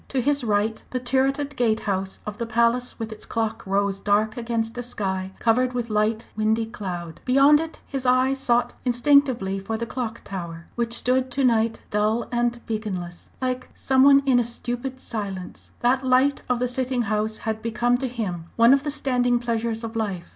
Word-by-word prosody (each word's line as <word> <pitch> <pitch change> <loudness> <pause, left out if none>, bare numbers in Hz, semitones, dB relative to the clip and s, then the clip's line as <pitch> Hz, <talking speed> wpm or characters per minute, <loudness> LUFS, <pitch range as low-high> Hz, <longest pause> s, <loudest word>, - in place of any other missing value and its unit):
To 270 - -1
his 285 +2 +1
right 215 0 0
the 255 - -2
turreted 270 +3 0
gate 225 -3 +1
house 190 -1 -2
of 210 +1 -6
the 235 - -2
Palace 235 +2 +1
with 225 -1 -5
its 215 - -8
clock 225 -1 -2
rose 195 0 0
dark 210 +2 +1
against 230 -1 -2
a - - -1
sky 190 -6 -3
covered 250 +2 +2
with 240 -2 -3
light, 215 +2 0
windy 220 +1 +1
cloud. 175 -6 -6
Beyond 275 +3 +5
it 325 0 -5
his 270 -2 -4
eye 255 +1 +3
sought 245 -3 +1
instinctively 245 -6 +3
for 220 +3 -3
the 235 - -3
Clock 230 -1 -5
Tower, 170 -3 -6
which 235 -1 -2
stood 255 +2 +1
to 270 +2 -1
night 230 -2 +2
dull 215 +3 +1
and 240 0 -1
beaconless 190 -6 -5
like 255 0 -2
some 265 -1 +2
one 275 0 +7
in 260 -3 +4
a - - +3
stupid 245 +2 -4
silence. 200 -7 -6
That 255 +2 +2
light 260 +2 +3
of 250 - +2
the 250 +1 0
sitting 250 0 -1
House 215 0 -1
had 220 0 -3
become 240 +2 +1
to 265 - -1
him 200 -9 -4
one 230 +2 +6
of 275 - +3
the 295 - -3
standing 250 -4 +1
pleasures 230 -1 -2
of 225 0 -6
life. 195 -6 -3
235 Hz, 190 wpm, -24 LUFS, 215-255 Hz, -, one